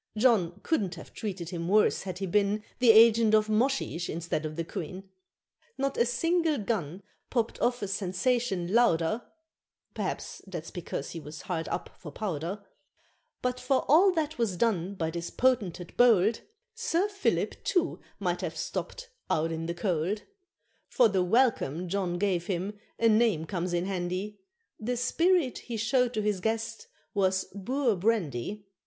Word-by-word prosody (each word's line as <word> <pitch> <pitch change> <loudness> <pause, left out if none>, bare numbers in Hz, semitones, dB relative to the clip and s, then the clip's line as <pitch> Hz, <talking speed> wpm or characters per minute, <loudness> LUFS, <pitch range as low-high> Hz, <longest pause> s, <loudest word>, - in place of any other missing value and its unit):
John 200 -6 +3
couldn't 195 - 0
have 165 - -12
treated 185 -6 -5
him 170 -2 -4
worse 210 +3 +3
had 185 -2 -5
he 195 - -3
been 205 +3 +1 0.2
The 250 -2 +4
agent 225 0 +7
of 215 0 +2
Moshesh 215 -6 0
instead 160 -1 -2
of 155 - -8
the 165 - -2
Queen. 185 +2 -6 0.7
Not 275 0 -1
a 235 - +2
single 330 +5 +1
gun 195 -5 -3 0.3
popped 235 -3 -1
off 245 -2 +1
a - - -1
sensation 195 0 0
louder 220 -3 +3 0.7
(Perhaps - - -4
that's 170 -4 -6
because 160 -5 -5
he 165 - -6
was 155 0 -9
hard 165 -3 -3
up - - -4
for 150 - -9
powder) 190 +3 -4 0.8
But, 250 0 -1
for 265 0 +1
all 355 +7 +6
that 315 -3 -2
was 210 -6 0
done 200 -3 0
by 160 -3 -2
this 170 0 -4
potentate 205 -9 0
bold, 225 -3 +5 0.3
Sir 450 -5 0
Philip 400 -1 -1
too 360 -2 +1 0.2
might 180 -3 -1
have 165 -3 -4
stopped - - -5 0.2
"out 160 +1 +1
in 165 0 -3
the 170 - -3
cold," 180 +2 -1 0.7
For 240 -3 +4
the 195 -2 +1
welcome 180 - +2
John 180 -1 -1
gave 180 -3 0
him 190 +2 -2 0.2
a 230 - +3
name 215 -7 +3
comes 180 0 -3
in 175 +1 0
handy, 185 +2 -3 0.4
The 245 +3 -2
spirit 330 +3 +2
he 235 -2 -6
showed 245 +2 +1
to 215 - 0
his 210 -2 0
guest 225 +2 -2 0.3
was 190 -1 +2
Boer 240 +4 0
Brandy. 195 - -1
205 Hz, 160 wpm, -29 LUFS, 175-240 Hz, 0.8 s, agent